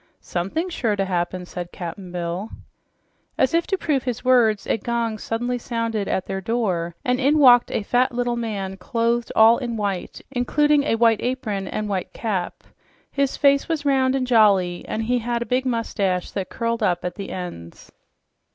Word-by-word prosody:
"Somethin's 315 - -3
sure 225 -9 0
to 195 -1 0
happen," 180 0 -2
said 175 0 -7
Cap'n 180 +1 -7
Bill. 175 +4 -4 0.9
As 260 - +2
if 335 0 +2
to 385 - 0
prove 295 -7 0
his 245 -1 -4
words, 235 -5 +4
a - - 0
gong 230 0 -2
suddenly 240 +3 -2
sounded 230 -4 -2
at 190 - -1
their 190 0 -4
door 185 -7 -1
and 250 0 +1
in 280 +3 +3
walked 245 -4 +7
a - - -2
fat 245 +5 +2
little 245 0 -1
man 200 -5 -4
clothed 235 +2 -1
all 225 +2 +6
in 240 -3 -3
white, 200 -4 -3
including 290 +3 +2
a 225 - +2
white 225 -1 +3
apron 215 -6 -2
and 215 +2 -3
white 195 -3 -3
cap. 195 -6 -3 0.5
His 280 -1 0
face 280 +1 +3
was 310 -3 -2
round 265 -2 +3
and 260 -1 0
jolly, 200 -7 +3
and 225 - -2
he 245 +2 +1
had 235 0 -2
a - - -12
big 255 +1 0
mustache 200 -6 -1
that 190 -2 -4
curled 230 0 -2
up 180 -4 0
at 180 - -2
the 200 - -7
ends. 85 - -8
230 Hz, 180 wpm, -22 LUFS, 195-250 Hz, 0.9 s, walked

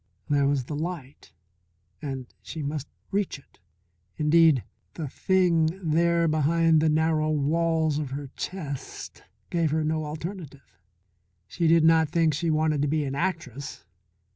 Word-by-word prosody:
There 140 -1 +3
was 140 -2 +1
the 145 +4 -6
light 150 -3 -6 0.7
and 135 -3 -4 0.2
she 160 -2 -6
must 145 0 -3 0.2
reach 200 -5 -1
it. 140 - -23 0.6
Indeed 155 -3 +4 0.3
the 160 -3 -4
Thing 175 +1 +2 0.2
there 170 +1 +3
behind 160 +1 +3
the 160 - +3
narrow 155 0 +2
walls 160 +1 +1
of 150 -3 -3
her 140 0 -6
chest 150 -8 -6 0.3
gave 165 -2 +1
her 155 +1 0
no 155 0 -1
alternative. 150 - -8 0.7
She 165 - -1
did 165 0 +5
not 160 -1 +5
think 165 -1 +2
she 165 +3 -1
wanted 155 -2 +1
to 145 - +1
be 150 0 0
an 135 - -3
actress. 145 - -4
155 Hz, 140 wpm, -26 LUFS, 145-165 Hz, 0.7 s, did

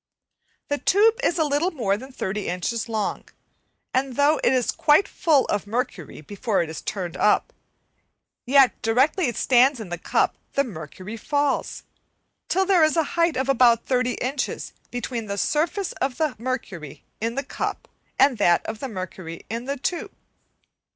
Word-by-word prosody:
The 290 0 0
tube 440 +4 +4
is 345 - +1
a 320 - +3
little 295 +4 +1
more 230 - 0
than 260 +6 -9
30 205 -4 -3
inches 200 +7 -2
long, 215 -2 -2 0.7
and 260 -1 0
though 290 +2 +3
it - - +4
is 255 -2 +2
quite 300 +6 +4
full 300 -6 +2
of 205 0 -2
mercury 205 - -4
before 200 - -1
it 160 - -6
is 160 - -7
turned 180 -4 -4
up, 210 +3 +2 0.9
yet 270 0 +4
directly 265 - +2
it 240 - -3
stands 260 +1 +4
in 215 -5 -7
the 175 -1 -4
cup - - +1 0.2
the 280 - +2
mercury 185 - -8
falls, 285 +4 -1 0.7
till 380 +1 +2
there 370 -4 +4
is 310 +2 +3
a 325 - +4
height 335 -4 +2
of 260 0 0
about 240 -3 +4
30 250 -1 +1
inches 270 +3 -3 0.2
between 240 -2 -4
the 200 0 -3
surface 335 - 0
of 265 -2 -1
the 310 -5 0
mercury 215 - -5 0.2
in 230 +2 -2
the 275 - -1
cup, - - -4 0.3
and 265 -4 +4
that 175 -4 +3
of 220 - -5
the 270 - -4
mercury 185 -4 -7
in 230 +2 -4
the 280 +1 -3
tube. 340 +6 -3
250 Hz, 170 wpm, -24 LUFS, 210-290 Hz, 0.9 s, tube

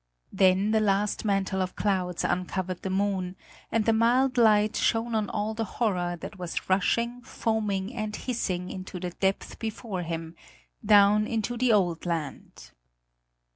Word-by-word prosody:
Then 190 +2 +3
the 220 - +3
last 205 0 +1
mantle 195 -2 0
of 185 0 -3
clouds 185 -4 -1
uncovered 185 0 -2
the 190 - -3
moon, 190 -1 -1 0.4
and 225 -2 +1
the 225 - +4
mild 250 +4 +3
light 215 -2 +4
shone 230 +1 +1
on 215 -2 0
all 210 +1 -2
the 225 +1 -2
horror 180 -6 0
that 205 - -8
was 175 -2 -4
rushing, 235 +6 +1
foaming 215 -3 -2
and 215 -3 -3
hissing 185 -7 -3
into 185 -1 -7
the 180 0 -4
depth 190 +2 -2
before 220 -3 -4
him, 165 -1 -5 0.5
down 210 0 +5
into 230 +1 -2
the 245 0 +2
old 180 -5 +1
land. 150 - -5
200 Hz, 150 wpm, -27 LUFS, 185-220 Hz, 0.5 s, down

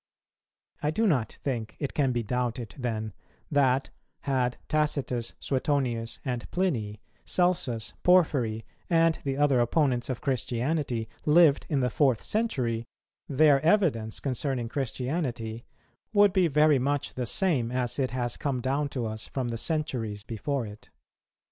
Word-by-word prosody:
I 150 - +1
do 220 +9 +1
not 130 - +2
think 120 -5 -4
it 140 - -3
can 135 -3 +2
be 120 -1 -1
doubted 120 0 -2
then 110 -5 -3 0.4
that, 135 -2 +2 0.3
had 130 -3 0
Tacitus, 140 -6 -1
Suetonius, 130 -4 -1
and 125 -2 -3
Pliny, 115 - -1 0.2
Celsus, 130 -12 0
Porphyry, 135 -12 +3 0.2
and 165 -1 +3
the 135 -1 -2
other 145 -3 +3
opponents 125 0 +1
of 130 - -2
Christianity, 130 -2 -1 0.2
lived 150 -2 +5
in 145 -4 +1
the 125 -1 +1
fourth 130 -3 +2
century, 125 - 0 0.5
their 140 0 +5
evidence 155 - +2
concerning 130 -2 -2
Christianity 125 -3 -3 0.5
would 205 -2 +5
be 185 -3 +4
very 150 -1 +4
much 140 +2 -1
the 125 -2 -3
same 145 - +1
as 125 0 -1
it 130 -2 +1
has 120 -1 -2
come 135 -3 -1
down 140 +4 0
to 125 -4 -3
us 110 0 -5
from 130 -3 -3
the 115 - -3
centuries 120 -10 -2
before 120 +4 -2
it. 105 0 -11
130 Hz, 140 wpm, -28 LUFS, 120-150 Hz, 0.5 s, lived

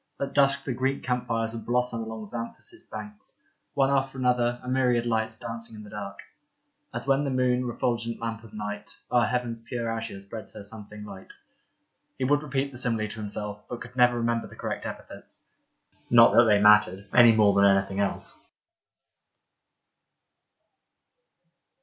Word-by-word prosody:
At 140 - -3
dusk 140 -1 +3
the 135 - -2
Greek 135 +3 -1
camp 125 -1 -1
fires 115 -1 -1
would 115 - -6
blossom 125 -1 0
along 110 -1 -6
Xanthus 115 +2 -7
banks 105 -1 -9 0.2
— - - -50
one 135 0 +3
after 135 -1 0
another, 125 -1 +1
a - - -9
myriad 125 -2 +2
lights 110 -1 -1
dancing 115 -1 -7
in 105 - -9
the 105 - -12
dark. 100 -1 -6 0.7
As - - -5
when 135 +1 +3
the 140 - -1
moon, 125 -1 +1
refulgent 115 -1 -2
lamp 115 -1 -4
of 115 - -13
night, 105 0 -6
O'er 120 -1 +4
heaven's 120 -1 -2
pure 115 0 -3
azure 115 -3 -4
spreads 100 +1 -9
her 105 - -8
something 105 0 -9
light. 95 -2 -11 0.8
He 130 - -2
would 145 +3 +3
repeat 140 -1 -2
the 120 - -6
simile 115 -4 0
to 110 - -8
himself, 105 0 -5
but 120 - -5
could 125 +1 -10
never 125 -1 +4
remember 115 0 0
the - - -14
correct - - -4
epithets. - - -9 0.6
Not 115 -1 +7
that 120 - +7
they 105 -2 +5
mattered 100 -2 +5
— - - -24
any 120 -2 +8
more 105 -2 +5
than 100 0 +5
anything 95 0 +3
else. 100 -1 -2
115 Hz, 170 wpm, -27 LUFS, 105-125 Hz, 0.8 s, any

